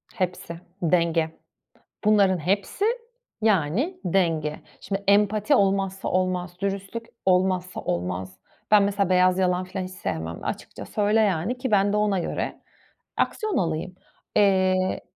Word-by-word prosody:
Hepsi, 180 -4 -3 0.2
denge. 170 -1 +2 0.8
Bunların 200 -3 +4
hepsi, 195 - -1 0.6
yani, 215 - +1
denge. 165 -5 0 0.2
Şimdi 200 0 -4
empati 210 +5 +4
olmazsa 195 -3 +1
olmaz. 180 -1 -1
Dürüstlük 200 +3 -3 0.2
olmazsa 185 0 +1
olmaz. 90 +2 -3 0.3
Ben 210 -1 +7
mesela 200 -1 +1
beyaz 185 0 +4
yalan 180 -1 +1
filan 185 0 -5
hiç 185 - -8
sevmem. 80 - -5
Açıkça - - -5
söyle, 210 +1 +2
yani, 200 +4 0
ki 255 -1 -3
ben 200 0 +3
de 210 - +1
ona 210 -2 +2
göre 175 - -3 0.6
aksiyon 430 -3 0
alayım. 170 +1 -2 0.4
Eee 185 -2 +3
185 Hz, 125 wpm, -25 LUFS, 175-205 Hz, 0.8 s, Ben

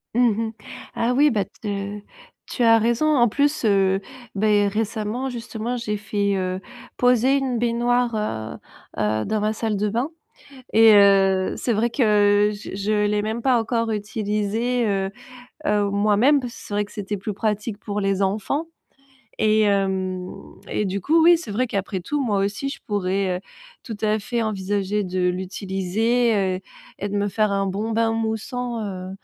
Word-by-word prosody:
Mmh 245 0 +5 0.2
mh. - - -6 0.4
Ah 235 +2 +1
oui, 290 +4 +5
bah 210 -4 +1
te 200 0 -5 0.5
tu 245 - -1
as 225 -1 +6
raison 235 +6 +1
en 240 -1 +5
plus, 285 +4 0
heu, 195 -2 +3 0.4
beh 205 0 +3
récemment 220 +4 -2
justement 235 -1 -4
j'ai 215 -3 -3
fait, 205 -1 -1
heu, 185 0 -2 0.3
poser 250 +2 +3
une 260 -3 -1
baignoire, 240 0 +1
heu 110 - -3 0.4
heu, 110 +1 0
dans 215 -1 -1
ma 215 +1 +1
salle 220 0 -2
de 205 +1 0
bain 235 +6 -1 0.7
et 225 0 +7
heu, 195 -2 +4
c'est 240 - 0
vrai 230 +3 +1
que, 260 - -1 0.5
heu, - - -4
je 205 -1 -8
je 210 +1 0
l'ai 210 0 +1
même 220 +2 -3
pas 255 -2 +3
encore 230 0 -1
utilisée, 215 +3 -1
heu 195 -1 0 0.6
heu, 205 -6 +2
moi-même. 210 +8 +3
Parce 245 -3 -6
que - - -12
c'est - - -9
vrai 205 0 +1
que 205 - -19
c'était 205 0 -4
plus 205 +2 -4
pratique 210 +1 -2
pour 205 -1 -4
les 195 -1 0
enfants 210 +10 -1 0.7
et 215 0 +3
hem 190 -2 0 0.4
et 210 - 0
du 195 +1 -2
coup, 320 - +3
oui, 345 +1 +7
c'est 325 - -8
vrai 250 +5 0
qu'après 195 -2 -3
tout, 290 +11 -2
moi 210 -5 +1
aussi, 200 +8 -1
je - - -7
pourrais, 195 -2 0
heu, - - -6 0.4
tout 225 - -7
à 215 0 +1
fait 235 +2 -2
envisager 205 -1 -1
de 180 -1 0
l'utiliser, 195 +5 0 0.2
heu, - - -14 0.4
et 205 - -3
de 205 - -2
me 205 0 0
faire 215 0 +1
un 195 0 0
bon 205 +4 -2
bain 225 0 +1
moussant, 225 +2 -3
heu, 185 -3 -5
210 Hz, 175 wpm, -23 LUFS, 200-235 Hz, 0.7 s, et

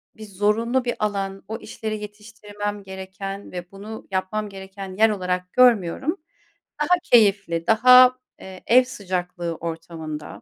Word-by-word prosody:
bir 220 - -10
zorunlu 215 +5 0
bir 240 - -1
alan, 195 -2 -2
o 220 +1 -4
işleri 215 -2 -5
yetiştirmem 210 -1 -7
gereken 190 +1 -7
ve 180 0 -7
bunu 210 +3 -9
yapmam 205 +3 -2
gereken 190 -1 -9
yer 220 +1 +5
olarak 180 -2 -3
görmüyorum. 250 - +3 0.6
Daha 355 +4 +3
keyifli, 200 - +3
daha, 250 +3 +7 0.2
eee, 190 -1 -11
ev 250 +2 +6
sıcaklığı 180 -7 -4
ortamında, 160 -2 -7
200 Hz, 125 wpm, -23 LUFS, 185-220 Hz, 0.6 s, daha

